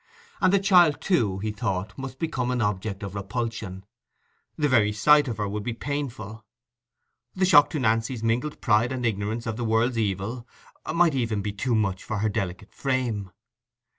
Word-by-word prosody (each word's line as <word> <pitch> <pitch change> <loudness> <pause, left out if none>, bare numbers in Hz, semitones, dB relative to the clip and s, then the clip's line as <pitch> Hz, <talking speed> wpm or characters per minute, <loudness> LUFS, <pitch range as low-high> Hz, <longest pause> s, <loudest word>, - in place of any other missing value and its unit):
And 185 - +4
the 200 - +5
child, 180 -6 +5
too, 115 - +1
he 105 +2 -3
thought, 100 -2 -3
must 135 -1 -7
become 135 -6 -2
an 125 -1 0
object 105 -1 -2
of 100 -1 -6
repulsion: 105 -2 -4 0.7
the 150 -2 +2
very 110 -6 +3
sight 145 +8 +5
of 115 - -3
her 105 -1 -1
would 105 +1 -3
be 115 +3 -3
painful. 115 -5 -5 0.9
The 185 0 +2
shock 145 -5 +6
to 155 - -3
Nancy's 115 0 0
mingled 120 +7 -1
pride 115 0 +3
and 125 -2 -3
ignorance 110 +1 -2
of 110 -2 -3
the 120 - -3
world's 115 +2 +1
evil 110 +4 -2 0.4
might 170 -1 +3
even 115 -6 -1
be 105 - -2
too 115 +4 -1
much 100 -4 0
for 110 - -3
her 110 +2 0
delicate 100 -1 -4
frame. 125 -7 -2
115 Hz, 175 wpm, -25 LUFS, 105-130 Hz, 0.9 s, shock